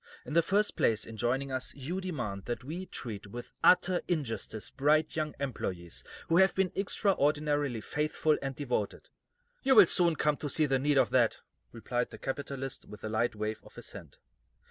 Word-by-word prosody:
In - - -6
the 170 - +6
first 200 +5 +1
place, 110 -1 +2
in 115 - -9
joining 130 +4 -1
us, 130 0 -3
you 160 +8 -4
demand 120 - -4
that 120 -1 -4
we 170 +7 -6
treat 105 -5 -6
with 120 +4 -8
utter 180 0 +5
injustice 115 - -3
bright 150 +3 +2
young 155 -1 -2
employees 85 - -4 0.2
who 165 0 +3
have 190 +1 +5
been 190 -1 +1
extraordinarily 150 - +1
faithful 150 +3 0
and 135 -1 -3
devoted." 125 -7 -3 0.5
"You 265 -1 +4
will 210 -4 +10
soon 170 -1 +4
come 150 0 +1
to 145 - -4
see 155 +3 +3
the 135 -2 +1
need 145 +1 +2
of - - +3
that," 120 -3 +3 0.3
replied 120 +2 -2
the - - -10
capitalist, 135 -1 -4
with 105 - -12
a 110 - -3
light 110 +1 0
wave 105 +1 -3
of - - -16
his - - -8
hand. - - -11
140 Hz, 185 wpm, -31 LUFS, 120-155 Hz, 0.5 s, will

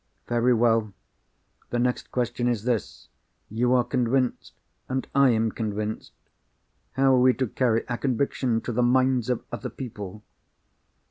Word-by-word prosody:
"Very 120 +1 +2
well. 115 -3 +2 0.8
The 120 - -1
next 125 +1 -1
question 120 0 -1
is 120 -4 0
this. 120 -5 -2 0.4
You 120 +4 +1
are 125 - +4
convinced; 125 +1 -1 0.4
and 130 0 -2
I 140 -1 +5
am 110 -1 +1
convinced—how 110 +4 -4
are 130 - +4
we 125 0 +4
to 130 - 0
carry 115 -1 0
our 120 - -2
conviction 130 -2 0
to - - -4
the 120 +2 0
minds 130 0 +2
of 125 - -1
other 120 - -5
people?" 105 -5 -8
120 Hz, 140 wpm, -25 LUFS, 115-130 Hz, 0.8 s, I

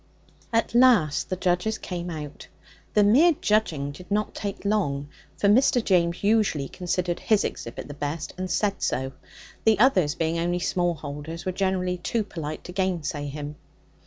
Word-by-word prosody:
At 230 0 +1
last 235 - +4
the 185 - 0
judges 180 +4 0
came 175 -1 -5
out. 150 -3 -7 0.5
The 210 - +6
mere 280 +12 +6
judging 165 -10 +1
did 180 +5 -12
not 210 +1 0
take 200 -1 -5
long, 145 -9 0 0.3
for 200 - +2
Mr. 245 +2 +4
James 175 -3 +2
usually 200 -10 +2
considered 175 +1 -2
his 215 -2 +2
exhibit 115 - -5
the 145 - -7
best, 145 +2 -4
and 185 0 -4
said 200 +2 0
so; 130 +2 -1 0.5
the 220 -2 +4
others, 190 - +4
being 165 0 0
only 175 +1 0
small 175 -1 0
holders, 150 +3 -7
were 185 - 0
generally 185 -1 0
too 215 +5 -1
polite 155 -6 -6
to - - -8
gainsay 170 -6 -2
him. 145 +1 -6
180 Hz, 160 wpm, -25 LUFS, 155-205 Hz, 0.5 s, The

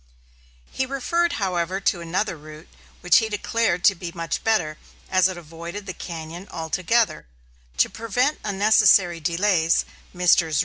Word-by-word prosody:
BABCOCK)] - - -18
He 260 - +2
referred, 335 +6 0
however, 185 -2 -1
to 185 -2 0
another 185 +3 -2
route 155 +1 -13 0.3
which 180 -1 +5
he 220 - -2
declared 210 -3 -1
to 200 - +6
be 175 -2 -7
much 165 -1 -4
better, 175 -9 0 0.3
as 185 -1 +4
it 185 -2 -5
avoided 170 +4 -8
the 185 - -5
cañon 170 +2 -8
altogether. 170 - 0 0.5
To - - +4
prevent 245 +6 -1
unnecessary 200 -4 +4
delays, 170 +1 +1 0.3
Messrs. 175 -3 +3
180 Hz, 140 wpm, -23 LUFS, 165-210 Hz, 0.5 s, to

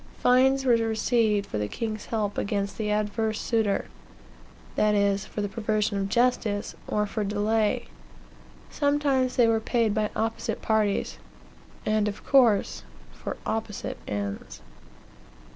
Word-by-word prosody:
Fines 265 +2 +4
were 250 - +5
received 225 -2 +1
for 105 - -4
the 105 - -1
king's 215 - -4
help 210 -3 -1
against 200 -1 -2
the 215 -1 -1
adverse 215 +1 0
suitor; 220 -4 0 0.9
that 210 0 +3
is, 200 -1 +1
for 205 -1 -3
perversion 215 -1 -1
of 195 0 -2
justice, 225 -3 +1
or 210 0 0
for 210 +1 -3
delay. 210 +1 0 0.9
Sometimes 285 -3 +1
they 245 - +5
were 225 -1 +3
paid 225 -1 +1
by 215 -1 0
opposite 225 0 -2
parties, 215 -2 0 0.7
and, 215 0 +2
of 205 - -5
course, 240 -7 +3 0.3
for - - -6
opposite 220 -2 -3
ends." 100 -9 -5
215 Hz, 125 wpm, -26 LUFS, 205-230 Hz, 0.9 s, were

